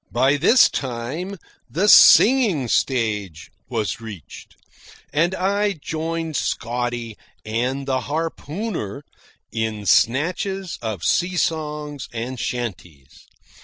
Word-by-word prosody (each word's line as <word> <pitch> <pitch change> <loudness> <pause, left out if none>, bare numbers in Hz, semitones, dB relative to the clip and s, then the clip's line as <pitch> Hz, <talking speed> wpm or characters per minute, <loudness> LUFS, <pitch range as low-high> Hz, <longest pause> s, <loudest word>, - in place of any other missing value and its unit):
By 130 +4 +3
this 195 - +6
time 135 +10 -4 0.3
the 190 +6 0
singing 210 - +7
stage 105 - -1 0.2
was 115 -1 -2
reached, 105 -8 -11 0.6
and 170 +5 +2
I 200 +2 0
joined 160 0 -4
Scotty 120 -2 -2 0.3
and 125 +5 -2
the 130 -1 0
harpooner 160 - -4 0.5
in 110 -2 -3
snatches 180 - +1
of 110 -7 -4
sea 180 - +1
songs 150 -3 -2
and 120 +2 -5
chanties. 90 - -6
135 Hz, 95 wpm, -22 LUFS, 115-165 Hz, 0.6 s, singing